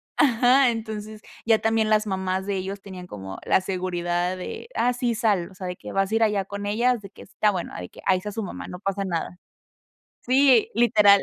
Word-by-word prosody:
ajá. 255 0 +5
Entonces 215 -1 -5 0.2
ya 225 -1 +5
también 225 -1 +1
las 215 0 +3
mamás 190 0 -1
de 200 -1 -1
ellos 195 +1 -4
tenían 185 -2 -9
como 95 - -8
la - - +4
seguridad 180 -1 -2
de: 320 - -7
"Ah, 245 +1 +2
sí, 240 -1 -1
sal" 205 -6 +1
o - - -16
sea, 185 - -7
de 180 - -4
que - - -9
"vas 195 +1 0
a - - +1
ir 225 - +3
allá 205 -3 +1
con 200 +1 -6
ellas", 235 +2 +1
de 195 - -10
que - - -14
"está 210 +2 0
bueno", 180 -3 -4
de 90 -1 -7
que - - -16
"ahí 185 -1 +3
está 210 +2 -6
su 220 +1 -4
mamá, 190 - -7
no 180 - -7
pasa 195 0 -2
nada". 180 -1 -3 0.9
Sí, 260 -2 +5
literal. 210 -4 +6
200 Hz, 220 wpm, -24 LUFS, 185-225 Hz, 0.9 s, literal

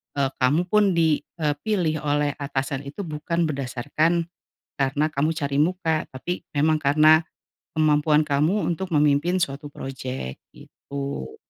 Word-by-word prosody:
eee, 140 -2 +1
kamu 140 +6 +3
pun 205 -3 +4
di, 160 -3 +3 0.2
eee, 150 -1 +2
pilih 175 -6 0
oleh 145 0 +2
atasan 140 0 -3
itu 150 +9 -6
bukan 170 +1 -2
berdasarkan 150 +3 0 0.5
karena 140 +2 +1
kamu 155 0 0
cari 140 -2 -2
muka, 165 -1 +1
tapi 170 +7 -5
memang 155 +1 +1
karena 155 +3 +5 0.5
kemampuan 150 0 +3
kamu 150 +6 +1 0.2
untuk 190 +3 -4
memimpin 150 +4 +3
suatu 145 -4 -2
project, 130 - -6 0.2
gitu. 140 - -7
150 Hz, 130 wpm, -24 LUFS, 140-160 Hz, 0.5 s, karena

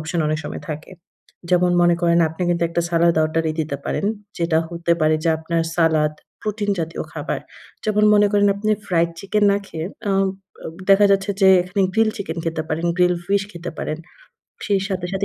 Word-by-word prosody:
Option 160 +2 -2
অনেক 155 - 0
সময় - - -6
থাকে। 155 +3 -7 0.6
যেমন 180 0 +3
মনে 175 0 +5
করেন, 170 0 +4
আপনি 160 +3 -6
কিন্তু 170 -1 0
একটা 170 +1 -1
সালাদ 170 0 +3
অর্ডারই 160 0 0
দিতে 150 -2 -3
পারেন, 200 - -1 0.3
যেটা 165 -2 +2
হতে 170 0 -1
পারে 155 0 +3
যে - - +2
আপনার 165 +1 -1
সালাদ, 155 -3 +3 0.3
প্রোটিন 210 -1 -2
জাতীয় 165 +1 -4
খাবার। - - -3 0.4
যেমন 210 0 +2
মনে 205 0 +5
করেন, 205 0 +4
আপনি 215 +1 -1 0.2
ফ্রাইড 170 -1 +1
চিকেন 205 +1 +1
না - - +2
খেয়ে 160 +1 -5 0.2
আ - - +2 0.5
অ - - -4 0.2
দেখা 200 +1 +7
যাচ্ছে 195 +1 +1
যে 190 - +7
এখানে 180 +2 -3
গ্রিল 225 -1 +3
চিকেন 175 -5 -5
খেতে 160 -1 -2
পারেন, 165 +2 -1
গ্রিল 180 0 +3
ফিশ 200 +1 +2
খেতে 175 0 -6
পারেন। 155 - -3 0.7
সেই 200 -2 +2
সাথে, 185 -3 -3
সাথে 195 +1 -1
170 Hz, 190 wpm, -21 LUFS, 165-195 Hz, 0.7 s, দেখা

